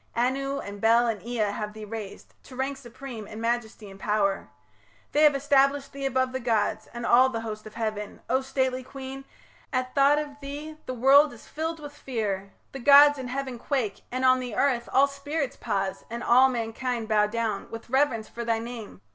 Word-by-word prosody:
Anu 275 +3 0
and 200 0 -8
Bel 230 +2 +5
and 225 -4 -1
Ea 225 -3 -1
have 210 +1 -4
thee 215 0 -8
raised 210 -2 -8
To 255 - -12
rank 270 +2 -2
supreme, 240 -3 -9
in 215 - -8
majesty 230 -2 -2
and 195 0 -12
pow'r, 200 - 0 0.6
They 295 - +2
have 300 -2 +6
established 275 0 +2
thee 275 0 -2
above 260 -1 0
the 260 - -3
gods 220 -3 0
And 235 0 -6
all 255 +2 +6
the 230 -3 -4
host 215 -1 -6
of 215 - -13
heaven... 215 -2 -4
O 260 - +2
stately 260 -1 -1
queen, 270 +1 -8 0.5
At 255 -1 -1
thought 280 +1 +5
of 290 -1 -4
thee 295 +2 -7
the 255 - -3
world 275 +5 +6
is 235 - -14
filled 325 +1 -4
with 290 -1 -9
fear, 200 -6 -3 0.2
The 270 - -7
gods 285 +2 +7
in 260 - -5
heaven 260 -1 -4
quake, 235 -7 -2
and 255 +1 -1
on 255 0 +5
the 245 -4 -5
earth 245 -3 +1
All 275 - +6
spirits 280 0 -3
pause, 195 -1 -2
and 235 +1 -5
all 255 +2 +6
mankind 235 0 -3
bow 210 -1 +3
down 220 -2 -2
With 225 0 -8
reverence 260 -5 +2
for 235 - -6
thy 230 -1 +1
name... 225 - -8
250 Hz, 195 wpm, -26 LUFS, 220-275 Hz, 0.6 s, gods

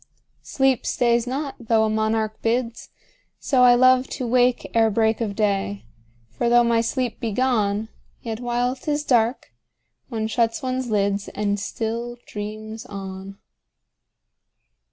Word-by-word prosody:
10 - - -37
Sleep 270 -2 +1
stays 235 0 +1
not, 275 +2 -3
though 225 -2 +2
a - - 0
monarch 220 0 -1
bids: 230 0 -1 0.5
So 260 -3 +1
I 245 -1 +7
love 255 +1 +5
to 255 - -3
wake 245 +1 +2
ere 225 -1 +4
break 220 +1 +1
of 205 -3 -2
day: 195 - -1 0.5
For 175 - -1
though 240 0 +5
my 235 -1 +2
sleep 245 0 -2
be 230 -3 -2
gone, 215 -3 0 0.3
Yet 225 -1 -5
while 245 +1 -1
'tis 295 +2 -2
dark, 240 -2 +1 0.6
one 225 -3 -2
shuts 230 +5 0
one's 255 -1 -2
lids, 200 -1 0
And 205 -1 -2
still 230 +3 -4
dreams 215 +2 -7
on. 195 -1 -8
230 Hz, 140 wpm, -23 LUFS, 215-245 Hz, 0.6 s, I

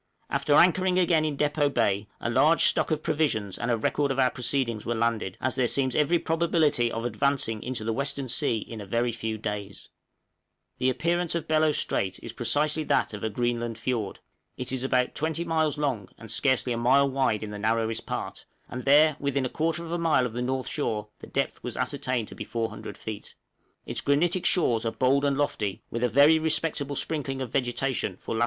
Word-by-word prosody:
After 145 - +2
anchoring 185 +2 +4
again 170 -3 +3
in 150 -2 -2
Depôt 145 0 +1
Bay, 100 -3 +1
a - - -3
large 145 +7 +4
stock - - +3
of 155 -1 -1
provisions 145 - -1
and 120 - -2
a 120 - +2
record 140 +6 0
of 135 - -1
our 130 -1 +3
proceedings 120 -3 -1
were 120 - -2
landed, 110 -5 -1
as 130 0 -1
there 130 -2 +1
seems 130 0 0
every 155 +3 +3
probability 160 -7 +1
of 115 +1 -4
advancing 120 -2 0
into 125 -3 -4
the 115 +1 -1
western 140 +1 -2
sea 115 -1 +1
in 110 0 -7
a - - -7
very 120 +4 0
few 110 -1 -4
days. 105 0 -2
{BELLOT 100 - -14
STRAIT.} 100 - -21
The 130 - +2
appearance 170 +5 0
of 170 - -3
Bellot 155 -1 +3
Strait 95 -1 -1
is 115 - -7
precisely 150 +6 0
that - - +1
of 105 - -7
a 110 - 0
Greenland 120 0 -2
fiord; 115 -3 -3 0.4
it 125 0 -2
is 130 -1 -2
about 125 -1 +1
20 160 +2 -1
miles 160 -2 +1
long 130 -10 -2
and 115 -3 -8
scarcely 130 -2 +1
a - - -2
mile 130 +4 +4
wide 130 -6 0
in 105 - -6
the 105 - -6
narrowest 115 +1 -1
part, - - -5 0.2
and 125 +1 -7
there, 150 +2 +5
within 140 -1 0
a - - -2
quarter 165 +3 -1
of 165 - -7
a 175 - -1
mile 160 -6 +3
of 120 - -4
the 120 - -3
north 130 +1 -2
shore 105 -2 -2
the - - -11
depth - - -2
was - - -4
ascertained 125 -4 -1
to - - -10
be - - -6
400 115 -1 -5
feet. 110 -2 -8 0.5
Its - - -3
granitic 170 +6 +2
shores 120 -11 +2
are 115 - 0
bold 135 +3 +2
and 140 -1 +1
lofty, 105 -9 -2
with 115 +1 -2
a 125 - +3
very 145 +7 +6
respectable 155 -2 -1
sprinkling 135 -3 -1
of 130 -3 -4
vegetation 125 -6 -1
for - - -6
lat. 110 - -2
130 Hz, 210 wpm, -27 LUFS, 115-150 Hz, 0.5 s, very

